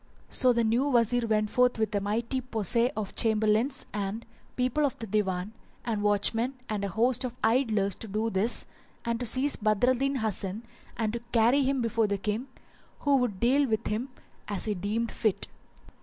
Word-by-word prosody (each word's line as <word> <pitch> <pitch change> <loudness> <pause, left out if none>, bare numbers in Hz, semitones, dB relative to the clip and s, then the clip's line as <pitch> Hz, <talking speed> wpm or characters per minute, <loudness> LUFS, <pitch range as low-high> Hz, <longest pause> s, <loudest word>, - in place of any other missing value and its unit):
So 255 - +5
the 235 -1 +2
new 230 +5 +2
Wazir 240 -1 +2
went 215 -1 +1
forth 250 -1 +3
with 220 -1 -1
a 205 - 0
mighty 230 +6 -1
posse 235 0 +1
of 210 -2 -4
Chamberlains 220 +4 +1
and 205 +2 -3 0.3
people 255 +4 0
of 280 -4 0
the 225 - -6
Divan, 190 -2 -1 0.3
and 220 -3 -1
watchmen 225 +5 +1
and 210 -2 -3
a - - 0
host 240 +6 +1
of 250 -1 -4
idlers 220 -4 +2
to 225 - -7
do 215 +3 -1
this 200 +5 +3 0.4
and 235 0 -1
to 245 - -2
seize 265 +5 +1
Badr 215 +3 +2
al - - +5
Din 275 +2 -1
Hasan 215 -2 -1 0.3
and 225 +1 -1
carry 240 +4 +4
him 270 -2 +1
before 230 -1 +1
the 200 0 -1
King, 210 +6 -3 0.5
who 285 -1 +3
would 240 -7 -1
deal 270 +4 +3
with 220 +1 -1
him 230 +5 -2 0.4
as 205 -2 -3
he 215 - 0
deemed 210 +4 -2
fit. 215 -4 -1
225 Hz, 185 wpm, -28 LUFS, 210-250 Hz, 0.5 s, So